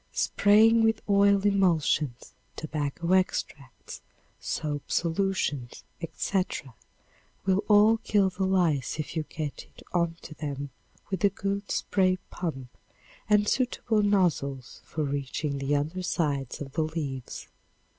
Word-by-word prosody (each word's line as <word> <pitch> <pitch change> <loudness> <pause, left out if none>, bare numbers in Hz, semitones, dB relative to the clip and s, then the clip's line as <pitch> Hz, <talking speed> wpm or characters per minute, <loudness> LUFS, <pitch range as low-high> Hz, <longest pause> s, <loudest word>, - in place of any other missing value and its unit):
Spraying 220 +3 +4
with 225 -1 +2
oil 200 0 +4
emulsions, 165 -9 +1 0.2
tobacco 155 +3 -2
extracts, 145 -8 -2 0.4
soap 145 -2 -4
solutions, 165 -7 -1 0.2
etc., 175 - -2 0.7
will 195 +1 +2
all 210 +2 +6
kill 200 -3 +2
the 185 +1 -3
lice 165 -10 +1
if 155 - -4
you 160 - +1
get 150 -3 -5
it - - -17
onto 170 -2 -2
them 145 -2 -5 0.4
with 190 - -2
a 200 - +6
good 200 +1 -3
spray 185 -2 +1
pump 135 -8 -5 0.5
and 210 0 +4
suitable 240 -3 +1
nozzles 165 - 0
for 155 - -4
reaching 140 0 -2
the 135 +2 0
under 155 +6 -2
sides 145 -8 -2
of 135 -2 -6
the 160 - -1
leaves. 150 -5 -4
170 Hz, 120 wpm, -27 LUFS, 145-200 Hz, 0.7 s, all